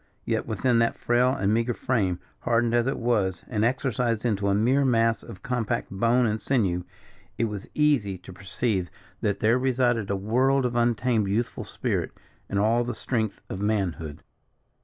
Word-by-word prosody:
Yet - - -1
within 115 +2 +1
that 115 0 +1
frail 120 +1 +2
and 100 -5 +1
meagre 115 +1 +1
frame, 100 -9 0 0.2
hardened 115 0 +1
as 120 +1 +2
it 135 - -1
was, 105 -7 0
and 110 -3 -1
exercised 120 -2 0
into 100 -4 0
a 100 - +3
mere 125 +7 +3
mass 115 -3 +2
of 90 - -11
compact 120 -2 -2
bone 115 +5 +2
and 110 -1 -1
sinew, 95 -10 0 0.5
it - - 0
was 105 -3 -6
easy 140 -11 +2
to 90 +1 -12
perceive 95 0 -2 0.3
that 100 -1 -1
there 115 +4 +3
resided 125 -4 +1
a 100 - +1
world 125 +7 +2
of 120 -1 -1
untamed 120 -2 +2
youthful 110 +5 -2
spirit, - - -2 0.4
and 100 - -1
all 115 +4 +3
the 120 -1 -4
strength 110 -2 -2
of 95 - -5
manhood. 90 -8 -2
115 Hz, 170 wpm, -26 LUFS, 100-120 Hz, 0.5 s, a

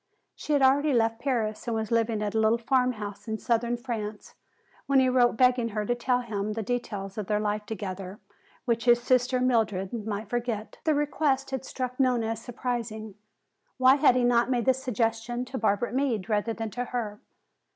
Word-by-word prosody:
She 300 - -3
had 285 -2 +3
already 280 +2 +4
left 225 -1 +2
Paris 235 -5 -2
and 230 - 0
was 220 0 -3
living 225 -2 +1
at 205 - -1
the 220 - 0
little 220 +1 +3
farmhouse 235 -4 -1
in 220 0 -2
southern 235 +1 0
France 220 -4 -5 0.5
when 275 -1 +4
he 260 -1 +4
wrote 245 -2 +3
begging 250 -2 +3
her 210 -1 -3
to 245 - +1
tell 245 +1 0
him 210 -3 -3
the 225 0 -3
details 205 -4 -4
of 205 - -4
their 210 -1 +1
life 210 0 -2
together 195 -2 -6 0.5
which 235 -1 0
his 240 -1 +6
sister, 255 +1 +2
Mildred, 220 -6 +1
might 210 0 -3
forget. 235 -2 -3
The 310 -2 +3
request 285 -2 0
had 265 -1 -3
struck 255 0 -5
Nona 245 -4 +2
as 225 0 -3
surprising. 230 -3 -4 0.6
Why 260 +1 +6
had 275 -3 +5
he 250 - +2
not 240 0 +3
made 245 -3 0
the 260 - +5
suggestion 240 -1 -2
to 260 +1 -5
Barbara 220 +2 0
Meade 250 -7 0
rather 215 +1 0
than 225 -1 -5
to 245 +3 -3
her? 220 -4 -4
235 Hz, 190 wpm, -27 LUFS, 215-250 Hz, 0.6 s, his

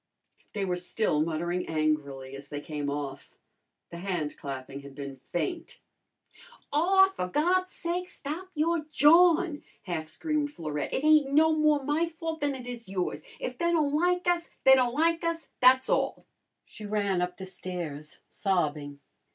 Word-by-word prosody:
They 200 -2 -1
were 180 -1 -1
still 180 -3 0
muttering 170 +3 -1
angrily 145 -4 -1
as 140 +1 -9
they 145 +1 -5
came 145 -1 -4
off. 140 -1 -5 0.5
The 170 - -7
handclapping 145 -7 -4
had 140 -1 -12
been 140 -1 -7
faint. 320 - -4 0.9
"Aw, 385 +5 +5
for 285 - -4
God's 360 - +1
sake, 350 +1 -3
stop 315 +6 -6
your 315 +1 +1
jawin'!" 325 +1 +5 0.2
half 165 -4 -4
screamed 305 - -1
Florette. 150 - -4
"It 265 - -1
ain't 305 -3 +5
no 315 +2 +5
more 305 -2 +3
my 300 +4 +1
fault 325 -1 -5
than 290 -2 0
it 255 -2 -8
is 240 -4 -7
yours. 185 -2 -2 0.2
If 255 0 -5
they 340 0 +2
don' 300 -4 +2
like 360 +3 +1
us 345 -1 +1
they 265 - +8
don' 255 -2 +4
like 330 +4 +2
us, 335 -1 -2
tha's 260 +1 +6
all." - - 0 0.4
She 215 - -12
ran 200 -3 0
up 180 0 -2
the 190 - -7
stairs, 175 -5 -7
sobbing. 150 -7 -1
240 Hz, 160 wpm, -28 LUFS, -, 0.9 s, they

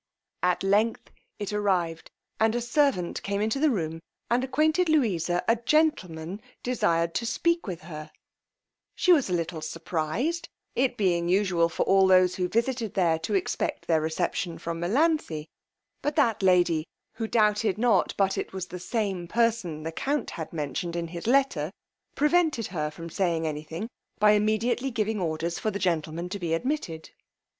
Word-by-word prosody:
At 180 +1 +1
length 210 +4 +1 0.3
it 205 0 -4
arrived, 180 -6 0 0.3
and 220 +1 +3
a - - +1
servant 240 - +1
came 200 0 -2
into 220 +5 0
the 310 +1 +4
room 165 - -2 0.3
and 245 +2 +3
acquainted 310 +6 +2
Louisa 180 - +1
a 230 - +4
gentleman 215 - 0 0.2
desired 170 -9 +1
to 235 - -1
speak 335 +3 0
with 180 -4 -5
her; 155 -2 -8 0.9
she 365 - +5
was 285 - +2
a - - -1
little 165 -1 -2
surprized, 165 - -2 0.2
it 250 -1 +1
being 175 -4 +1
usual 180 -3 +3
for - - -1
all 195 0 +4
those 185 -1 +5
who 180 -1 -1
visited 230 -2 -1
there 170 -4 +2
to 205 +5 -2
expect 190 - -1
their 160 -2 +2
reception 165 +2 -2
from 165 0 -4
Melanthe; 210 - +1 0.6
but 295 0 -1
that 225 -3 +2
lady, 175 -4 +3 0.3
who 225 -1 -2
doubted 210 -2 +2
not 240 +1 +2
but 195 -1 +2
it - - -5
was 190 -1 -4
the 180 - -6
same 190 -3 -2
person 215 -8 0
the 165 - -3
count 280 - -2
had 160 - -6
mentioned 160 +2 -3
in 170 -1 -3
his 170 +3 -6
letter, 240 - +2 0.4
prevented 300 -5 +2
her 150 -3 -1
from 165 +2 -9
saying 170 -3 0
any 150 -1 -2
thing, 165 +7 -6 0.3
by 210 0 +5
immediately 215 +5 +1
giving 220 -3 -1
orders 165 0 -2
for 220 - 0
the 200 - -3
gentleman 170 -2 -1
to 200 - -4
be 165 -3 0
admitted. 170 - -3
190 Hz, 165 wpm, -27 LUFS, 170-235 Hz, 0.9 s, she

